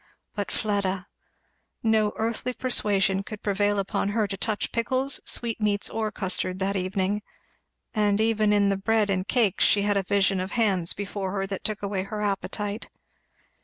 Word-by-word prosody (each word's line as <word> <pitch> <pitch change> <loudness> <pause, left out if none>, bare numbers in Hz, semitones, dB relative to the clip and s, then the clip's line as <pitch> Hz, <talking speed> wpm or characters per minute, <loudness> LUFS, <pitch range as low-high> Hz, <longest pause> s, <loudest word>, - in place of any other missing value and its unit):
But 205 -2 -3
Fleda! 195 -3 -1 0.8
No 220 -2 +3
earthly 230 +3 -2
persuasion 200 -6 +1
could 210 +1 -9
prevail 205 0 +1
upon 195 0 0
her 215 +1 +1
to 200 -1 -4
touch 210 +1 -2
pickles, 260 +3 +1
sweetmeats, 215 -3 0
or 220 -1 -1
custard, 185 -1 0
that 195 +1 -1
evening; 190 +2 0 0.7
and 210 -2 +2
even 215 -1 +3
in 205 -1 +4
the 195 - +1
bread 215 0 +2
and 185 0 -1
cakes 225 -7 +2
she 205 - +4
had 205 0 +2
a - - +3
vision 195 0 +2
of 185 +2 -4
hands 195 -7 +2
before 195 -1 -4
her 195 -1 -1
that 195 -1 -5
took 210 -1 -3
away 200 -1 -1
her 210 +2 -5
appetite. 205 +1 -2
205 Hz, 165 wpm, -26 LUFS, 195-215 Hz, 0.8 s, in